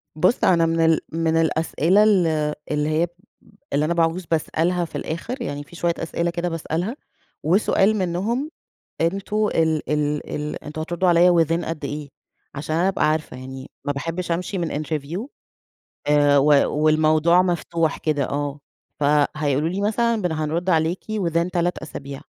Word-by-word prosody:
بُصّ، 185 +9 +2
أنا 170 -2 +4
من 165 0 0
ال 160 -1 +4
من 165 0 +1
الأسئلة 165 +4 +2
ال 195 -5 +4 0.4
اللي 150 0 0
هي، 155 +2 +2
ب 175 - -13 0.6
اللي 145 +2 +2
أنا 170 - 0
باعوز 170 +1 0
باسألها 170 +2 0
في - - -8
الآخر، 240 - -4
يعني 145 -8 -4
في 175 +4 -14
شويّة 170 0 0
أسئلة 170 +1 -1
كده 170 +1 -2
باسألها، 165 - -3 0.5
وسؤال 195 +4 +3
منهم، 205 - -1 0.5
أنتم 195 +5 0
ال 160 -4 0
ال 150 0 -1
ال 150 0 -5
أنتم 155 +1 -6
هتردوا 175 +3 0
عليَّ 175 +1 +6
within 165 +1 +2
قد 155 -3 -4
إيه، 145 0 -5 0.5
عشان 150 +2 -3
أنا 175 +3 +2
أبقى 190 -5 +2
عارفة، 155 -4 -2
يعني 130 +1 -9 0.2
ما 145 - 0
باحبش 170 +5 -4
أمشي 180 +3 -2
من 160 -3 -2
interview 160 - -4 0.8
آآ، 145 -1 +4
و 140 - +4 0.4
والموضوع 155 +3 +4
مفتوح 170 -3 0
كده 150 -3 0
آه، 145 0 -3 0.4
فهيقولوا 150 0 +1
لي 190 +3 -3
مثلًا 225 +1 +1
بن 180 -3 0
هنرُد 160 +3 -1
عليكِ 165 +1 +1 0.2
within 170 +1 0
3 175 0 0
أسابيع، 140 -3 -8
165 Hz, 160 wpm, -22 LUFS, 150-180 Hz, 0.8 s, عليَّ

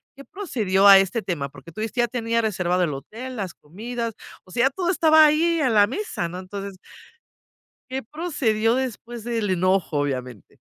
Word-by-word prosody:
¿qué 275 - -12
procedió 215 - +1
a 195 - +11
este 195 +4 0
tema? 145 -7 -3
Porque, 170 - -14
tú 215 - -7
dijiste 225 +2 -1
ya 240 - +2
tenía 230 -1 -1
reservado 180 -4 0
el 150 -4 -1
hotel, 230 - -8
las 195 -6 -5
comidas. 230 +8 -6 0.3
O 185 - -19
sea 250 +6 +3
todo 355 +5 -1
estaba 315 -3 +6
ahí 325 +2 +2
a 260 - +2
la 205 -3 +5
mesa 255 - -4
¿no? 180 - -7
Entonces 195 0 -7 1.1
¿Qué 265 +1 -3
procedió 230 -6 0
después 240 -3 -4
del 230 -4 -1
enojo, 185 -3 +1
obviamente? 125 -6 -5
220 Hz, 175 wpm, -23 LUFS, 185-255 Hz, 1.1 s, a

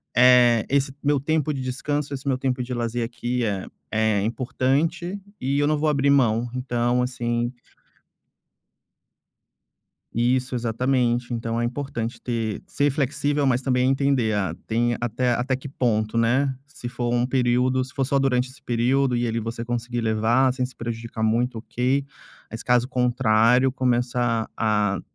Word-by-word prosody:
eh, 120 -2 +6
esse 140 0 +1
meu 145 0 +2
tempo 150 +1 0
de 135 - -4
descanso, 140 +3 -2
esse 140 +1 -6
meu 130 - +2
tempo 130 -1 -1
de 125 - -5
lazer, 120 0 -2
aqui, 120 +1 -2
é 100 -3 -2 0.2
é 110 -2 +2
importante 140 - -1 0.2
e 135 +2 -1
eu 145 - +2
não 155 0 +2
vou 155 +1 +1
abrir 140 -1 +2
mão". 120 -4 +3
Então, 125 -1 0
assim 120 -1 -1 2.6
Isso. 125 +2 +1
Exatamente. 120 +1 0
Então, 115 0 -2
é - - 0
importante 120 -2 -4
ter 115 -3 -3
ser 145 +1 +1
flexível, 145 +1 0
mas 125 -1 +2
também 125 -1 +1
entender 135 -5 +1
a 95 -6 -1
tem 120 +1 +1
até 120 +1 0
até 125 +2 0
que 135 +2 -8
ponto, 115 -4 0
né. 130 +4 +2
Se 145 -4 -9
for 120 -1 -2
um 120 0 +2
período 130 0 +2
se 130 - -11
for 135 -2 0
só 140 - +1
durante 130 -2 +1
esse 130 - -16
período 125 +2 +1
e 120 0 0
ali 115 +1 -1
você 115 +1 -5
conseguir 120 0 -3
levar 115 +4 +2
sem 130 -1 -1
se 130 - -11
prejudicar 115 -1 -5
muito, 115 +2 +1
ok, 125 +4 -1 0.4
mas 115 - -7
caso 125 0 +2
contrário, 125 0 +3
começar 120 -2 0
a 105 -3 +1
125 Hz, 160 wpm, -24 LUFS, 115-135 Hz, 2.6 s, eh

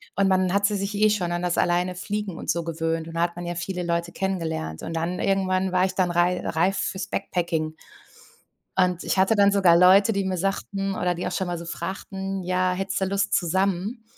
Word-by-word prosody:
Und 195 -1 +3
man 185 -1 +2
hatte 205 +1 +2
sich 200 +1 -3
eh 215 +1 +4
schon 180 -5 -1
an 175 +1 -2
das 175 -1 0
alleine 175 +1 +1
fliegen 200 0 -4
und - - -7
so 170 0 +1
gewöhnt. 165 0 -2
Und 165 - -9
da 165 - -1
hat 170 0 0
man 175 0 -6
ja 175 - -3
viele 180 +1 -4
Leute 170 0 -1
kennengelernt. 160 - -3
Und 165 - -5
dann 170 +3 -2
irgendwann 190 -1 +1
war 185 0 +3
ich 190 - -2
dann 185 -2 +1
rei 175 +1 +2
reif 185 +4 +1
fürs 190 0 -2
Backpacking. 160 -4 -2 1.0
Und 180 -1 +2
ich - - 0
hatte 190 +4 +4
dann 200 0 +5
sogar 190 -4 +5
Leute, 195 +5 +6
die 200 -1 -1
mir 185 -1 -1
sagten, 195 +1 -2
oder 180 0 0
die 175 - -4
auch - - -2
schon 190 +1 -1
mal 175 -1 -2
so 170 - -7
fragten: 190 +3 -5
„Ja, 185 0 +1
hättest 195 +1 -2
du 190 - +1
Lust 195 +1 -1
zusammen?“ 190 +5 0
185 Hz, 220 wpm, -24 LUFS, 175-195 Hz, 1.0 s, Leute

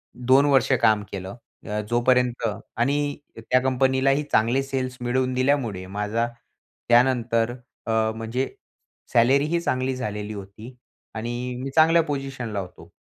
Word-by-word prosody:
2 130 +3 +4
वर्ष 140 -1 +3
काम 105 0 +4
केलं. 95 0 -6 0.3
अ, 105 0 -2
जोपर्यंत 120 0 +2 0.3
आणि 145 +4 0 0.2
त्या 115 +3 +1
कंपनीलाही 130 +2 +2
चांगले 120 +5 +3
सेल्स 130 -2 -3
मिळवून 130 +1 0
दिल्यामुळे 125 -7 0
माझा 105 +4 -1 0.6
त्यानंतर 120 -2 +3 0.4
अ, - - 0 0.2
म्हणजे 115 +4 -2 0.7
सॅलरीही 140 +8 +3
चांगली 130 -5 -1
झालेली 105 -4 -4
होती 105 +5 -10 0.4
आणि 115 +2 -3 0.3
मी 135 - -3
चांगल्या 165 +1 +6
पोझिशनला 135 -7 -4
होतो. 90 -2 -9
125 Hz, 120 wpm, -24 LUFS, 115-135 Hz, 0.7 s, चांगल्या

